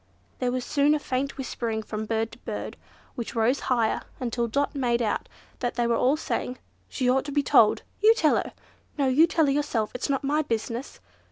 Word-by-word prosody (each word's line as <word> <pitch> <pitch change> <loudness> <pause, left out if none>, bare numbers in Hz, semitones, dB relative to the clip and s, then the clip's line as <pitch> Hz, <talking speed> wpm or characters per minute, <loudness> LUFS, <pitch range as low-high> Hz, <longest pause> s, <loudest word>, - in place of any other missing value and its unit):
There 250 -1 0
was 250 -1 -2
soon 290 +1 +3
a - - -1
faint 270 0 -2
whispering 230 -4 -3
from 215 0 -5
bird 225 0 -1
to - - -13
bird, - - -5 0.4
which 240 -3 -6
rose 235 +4 +2
higher 235 -3 +1 0.2
and 245 -3 -3
higher, 240 - -1
until 235 - +2
Dot 280 +6 0
made 245 -4 +1
out 220 -3 -1 0.3
that 245 - -2
they 240 0 +1
were 235 0 +2
all 260 +6 +3
saying, 255 -4 -3 0.3
"She 255 - -1
ought 260 +1 +3
to 290 - -5
be 290 0 +1
told!" 225 -4 +4 0.2
"You 440 +2 +7
tell 315 -9 +3
her!" - - -3 0.4
"No, 280 -2 +2
you 290 +6 +5
tell 320 -1 +2
her 275 - +2
yourself, 275 -7 0
it's 250 - -3
not 275 -1 0
my 295 +3 +2
business!" 235 -1 -4
255 Hz, 215 wpm, -26 LUFS, 235-285 Hz, 0.4 s, You